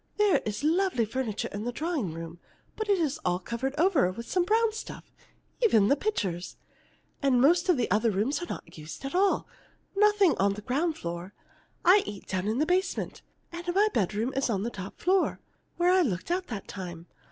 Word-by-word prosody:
There 420 -2 +4
is 210 +6 -3
lovely 330 - +2
furniture 230 -2 -3
in 205 +1 -5
the 245 - -2
drawing 295 - -2
room, 165 +1 -8 0.4
but 435 -1 -4
it 400 - +4
is 305 -5 -1
all 180 0 +1
covered 235 +8 -4
over 320 - +3
with 235 +5 -8
some 360 -2 +1
brown 445 +2 +2
stuff 445 - -8 0.5
even 225 - +4
the 280 - +5
pictures. 195 - -3 0.6
And 270 -3 +3
most 340 +8 +4
of 350 - +5
the 245 - +1
other 220 +4 +3
rooms 220 - 0
are 350 - -5
not - - -8
used 155 - -8
at 275 - -4
all 390 +2 +2 0.5
nothing 415 -3 +4
on 195 +1 +3
the 210 +1 -8
ground 310 +7 0
floor. 175 +3 -6 0.5
I 380 +4 +7
eat 205 -2 -7
down 190 +1 -2
in 220 +2 0
the 300 - +2
basement, 370 +3 -1 0.3
and 345 +1 -6
my 420 +2 +4
bedroom 215 +4 0
is 270 -1 0
on 200 -3 0
the 235 - -2
top 195 -2 -8
floor 370 +1 +2 0.4
where 355 +1 +4
I 370 0 +5
looked 210 - -1
out 365 +1 -1
that 215 -5 -6
time. 175 -3 -7
265 Hz, 200 wpm, -28 LUFS, -, 0.6 s, I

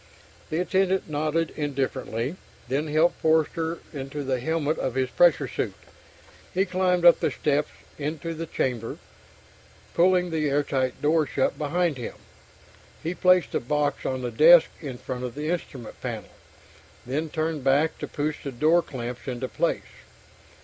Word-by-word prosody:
The 155 - -1
attendant 190 +1 +1
nodded 155 +2 -1
indifferently, 135 -2 -2 0.3
then 140 +5 -1
helped 155 +3 +2
Forster 160 +1 +1 0.2
into 140 +1 -5
the 130 -2 -1
helmet 155 +2 -1
of 130 - -2
his 130 -1 0
pressure 175 -3 +4
suit. - - -3 0.8
He 190 +2 +3
climbed 180 -1 +1
up 170 - +8
the - - +1
steps 150 0 0 0.3
into 155 +3 -3
the 165 +1 -5
chamber, 120 -6 -2 1.0
pulling 180 0 +3
the 155 -2 0
airtight 135 -3 0
door 155 0 +3
shut 135 - 0
behind 160 +1 0
him. 120 - -6 0.9
He 165 +2 -1
placed 180 0 +4
the - - 0
box 145 +3 -1
on 130 -1 -2
the 120 - -2
desk 160 +8 +7
in 135 -6 -6
front 130 0 -5
of 125 0 -5
the 150 +3 -2
instrument 135 -9 -5
panel, - - -5 0.8
then 150 +6 -2
turned 155 -2 -2
back 145 +4 +2
to - - -4
push 150 +1 -3
the 140 - -4
door 155 +7 +3
clamps 125 -4 -7
into 130 0 -3
place. - - -2
150 Hz, 150 wpm, -26 LUFS, 135-165 Hz, 1.0 s, up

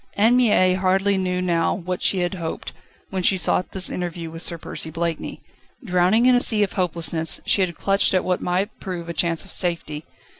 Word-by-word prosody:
Anne 225 +4 +4
Mie 210 -7 +4
hardly 190 +2 +1
knew 180 -1 -1
now 170 -2 +1
what 180 0 -5
she 190 - +1
had 175 +2 -1
hoped, 170 -3 -6 0.4
when 190 -1 -2
she 190 +1 +2
sought 180 0 +2
this 190 -1 +2
interview 170 -2 -5
with 165 0 -8
Sir 170 -1 +2
Percy 160 - -5
Blakeney. 165 0 -4 0.4
Drowning 185 +4 +3
in 255 - +6
a 245 - +3
sea 215 -4 +3
of 200 - -3
hopelessness, 170 -3 -2
she 200 - +2
had 175 -3 -1
clutched 195 -1 +1
at 185 - +2
what 180 -1 0
might 190 +4 -2
prove 180 -3 -6
a - - -3
chance 165 0 -1
of - - -12
safety. 165 -4 -2
180 Hz, 200 wpm, -22 LUFS, 170-195 Hz, 0.4 s, in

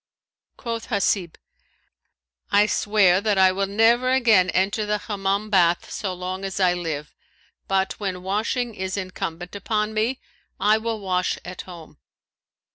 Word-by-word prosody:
Quoth 230 -1 -5
Hasib, 200 -6 0 1.2
"I 205 0 +5
swear 205 -3 +3
that 210 -2 +1
I 190 -1 +6
will 195 +1 -1
never 230 +5 +3
again 225 -8 +4
enter 200 +3 +1
the 210 0 0
Hammam 205 0 -2
bath 175 -3 +2
so 200 -4 -3
long 185 +1 -5
as 195 0 -4
I 180 -2 +4
live, 160 -4 -4 0.5
but 195 0 0
when 185 -3 -4
washing 225 +5 -1
is 190 -1 -4
incumbent 180 -2 -5
on 215 -1 0
me, 225 +5 0 0.4
I 210 +3 +3
will 225 0 -3
wash 185 -2 -1
at 180 +1 -7
home." 170 - -12
195 Hz, 140 wpm, -23 LUFS, 185-215 Hz, 1.2 s, I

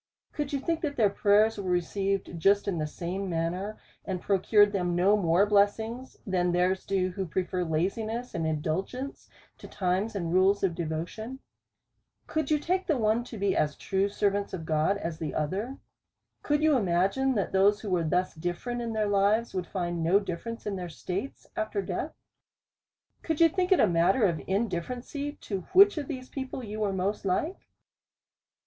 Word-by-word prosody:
Could 290 -2 -3
you 280 - 0
think, 330 +3 -1
that 290 -3 -2
their 215 -6 +3
prayers 210 +2 +3
were 190 -2 -3
received 190 +1 -1
just 200 +5 +3
in 180 -5 -1
the 155 - -1
same 185 +5 -4
manner, 175 +5 -2 0.3
and 190 -2 -3
pro 195 +1 +1
cured 205 +1 +5
them 180 -3 0
no 190 +4 +4
more 180 -1 +3
blessings, 220 +5 +1
than 180 -2 +1
theirs 180 +2 +1
do, 190 -1 +1
who 190 0 -4
prefer 180 +2 -1
laziness 215 +9 -2
and 165 -1 -1
indulgence 180 - -3 0.3
to - - -10
times 190 +4 -1
and 170 -4 -2
rules 190 +2 +4
of 185 -3 +2
devotion? 170 +10 -4 0.9
Could 315 -3 -2
you 305 - +4
take 365 +5 -1
the 310 - +2
one 220 +1 +2
to 235 - -8
be 200 -1 +1
as 150 -1 +1
true 195 +1 0
servants 200 0 0
of 165 -3 -7
God, 160 +6 +1
as 165 -4 -5
the 160 - -4
other? 195 - -2 0.6
Could 295 +1 +1
you 310 -2 +5
imagine, 200 +6 +2
that 200 - -1
those 200 +2 +4
who 205 - -5
were 175 -2 +2
thus 180 +3 0
different 175 +9 -3
in 230 -1 -3
their 215 -1 0
lives, 205 +3 +2
would 180 -2 -3
find 175 -2 -2
no 175 +5 +4
difference 210 +4 -6
in 205 -2 -2
their 180 -1 -5
states 185 - -5
after 215 -1 -2
death? 195 - -3 1.1
Could 320 -2 -2
you 335 -1 +7
think 365 +2 -1
it 375 - +6
a - - +6
matter 180 +5 +3
of 170 -4 0
indifference 200 +4 -2 0.3
to 195 -3 -3
which 395 -2 +7
of 285 - -5
these 255 -3 -6
people 265 -1 -5
you 215 -1 -6
were 210 -2 +1
most 195 +2 -1
like 205 - -1
200 Hz, 180 wpm, -28 LUFS, 180-230 Hz, 1.1 s, you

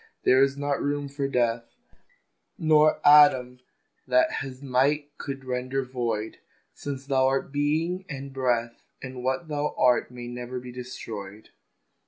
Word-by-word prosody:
There 130 +1 +5
is 135 0 +2
not 145 0 -1
room 145 0 -1
for 140 0 -2
Death, 120 -3 -1 0.8
Nor 155 -1 +4
atom 130 -4 +6 0.5
that 320 0 +3
his 135 0 -8
might 145 +3 +1
could 135 -1 -6
render 130 +1 -2
void: 115 -4 -3 0.5
Thou 145 -1 -2
Thou 135 0 +1
art 135 +1 -1
Being 160 +6 -1
and 140 -2 -7
Breath, 120 -3 -1 0.2
And 130 -1 -7
what 130 +5 -1
Thou 150 -1 -2
art 125 -1 +3
may 120 -1 -8
never 125 +1 -6
be 125 0 -9
destroyed. 110 -5 -8
130 Hz, 140 wpm, -26 LUFS, 125-145 Hz, 0.8 s, atom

